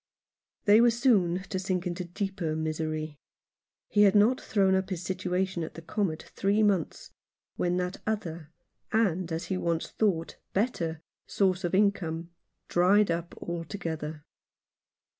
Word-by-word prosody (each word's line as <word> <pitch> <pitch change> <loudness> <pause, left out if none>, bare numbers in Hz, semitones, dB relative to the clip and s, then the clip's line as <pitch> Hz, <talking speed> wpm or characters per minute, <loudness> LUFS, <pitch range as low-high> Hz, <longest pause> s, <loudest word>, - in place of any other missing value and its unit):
They 210 +2 +7
were 240 - +6
soon 210 -7 +2
to 190 -1 -4
sink 185 -1 -1
into 180 0 -3
a - - -13
deeper 180 -3 -3
misery. 155 -1 -3 0.7
He 205 - +2
had 200 -1 +6
not 220 +5 +4
thrown 195 -3 +2
up 190 0 +1
his 180 -3 -3
situation 185 0 -1
at 160 - -7
the 165 - -8
Comet 170 -2 -2
three 205 +2 +2
months, 195 -6 0 0.4
when 180 0 0
that 180 +1 -2
other 170 -8 -3 0.2
— - - -43
and, 185 -6 +1
as 165 +2 -2
he 185 +1 -2
once 170 -2 -1
thought, 180 -7 0 0.2
better 170 -7 -1
— - - -56
source 190 -2 +2
of 175 +1 0
income 175 -5 +1 0.4
dried 190 +2 +4
up 170 +1 -3
altogether. 165 -3 -5
180 Hz, 150 wpm, -28 LUFS, 165-200 Hz, 0.7 s, They